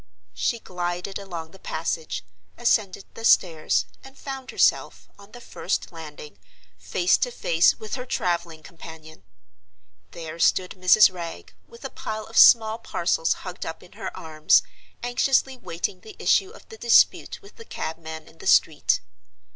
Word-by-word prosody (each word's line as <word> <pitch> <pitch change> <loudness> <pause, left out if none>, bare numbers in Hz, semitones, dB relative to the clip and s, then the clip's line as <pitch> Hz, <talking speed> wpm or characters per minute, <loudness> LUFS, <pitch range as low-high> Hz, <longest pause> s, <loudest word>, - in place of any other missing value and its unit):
She 100 - -1
glided 180 -1 -4
along 170 -5 -7
the 195 - -16
passage, 155 - -4 0.3
ascended 210 -5 +1
the 225 - -10
stairs, 165 -8 +3 0.2
and 270 0 -14
found 270 -1 -7
herself, - - +1
on 200 +1 -16
the 245 - -11
first 205 -4 -4
landing, 150 - -11 0.4
face 180 - +1
to 250 - 0
face 170 -7 +2
with 215 - -8
her 250 -1 -3
traveling 170 -5 -2
companion! 160 - -12 0.9
There 165 0 -8
stood 180 +2 +2
Mrs. 185 +1 +5
Wragge, 170 -2 -8
with 465 0 -13
a - - -5
pile 215 0 -5
of 225 - -14
small 220 -1 +7
parcels 170 -6 0
hugged 180 -1 -6
up 160 - -7
in 180 - -17
her - - -6
arms, 155 - +2 0.4
anxiously 260 +2 +1
waiting 180 -5 -5
the 425 - -12
issue 385 - +2
of 455 - -16
the 445 - -12
dispute 235 - +3
with 400 - -17
the 460 - -11
cabman 160 - -7
in 160 - -19
the - - -7
street. 90 - +3
180 Hz, 155 wpm, -24 LUFS, 160-225 Hz, 0.9 s, small